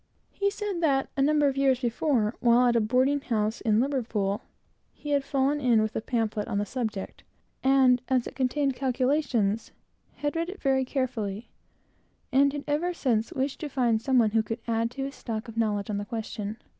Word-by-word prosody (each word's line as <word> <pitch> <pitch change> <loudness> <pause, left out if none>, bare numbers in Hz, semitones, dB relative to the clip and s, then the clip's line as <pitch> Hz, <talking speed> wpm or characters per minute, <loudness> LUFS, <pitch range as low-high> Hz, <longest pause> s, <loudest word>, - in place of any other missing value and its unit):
He 400 0 0
said 405 -3 -4
that, 275 -4 +1
a 275 - 0
number 295 +1 +3
of 275 - 0
years 270 -2 +3
before, 240 -2 0
while 240 +1 +4
at 240 -1 +3
a 230 - +4
boarding 260 +6 +2
house 220 -3 -1
in 220 -2 +2
Liverpool, 230 -6 -1 0.5
he 295 - -7
had 285 -1 +2
fallen 275 +2 0
in 240 -4 +4
with 215 0 -1
a - - -1
pamphlet 220 -3 -1
on 200 - -2
the 205 - 0
subject, 220 -4 -4 0.4
and, 265 -2 +5
as 255 -2 +1
it - - -8
contained 275 +1 0
calculations, 255 -5 0 0.4
had 290 +1 -3
read 335 +1 -1
it 385 +1 -8
very 265 -1 +1
carefully, 240 -6 -3 0.8
and 280 +1 +4
had 285 0 -5
ever 335 +5 0
since 235 -3 0
wished 270 -2 -2
to 305 - -4
find 240 -5 +1
some 260 +2 +2
one 220 -3 +4
who 225 +1 +3
could 225 +2 -5
add 230 0 +1
to 270 +3 -5
his 275 0 -4
stock 225 -4 -5
of 230 - -9
knowledge 210 -3 0
on 205 - -1
the 205 - -4
question. 215 -1 -5
255 Hz, 195 wpm, -27 LUFS, 225-275 Hz, 0.8 s, and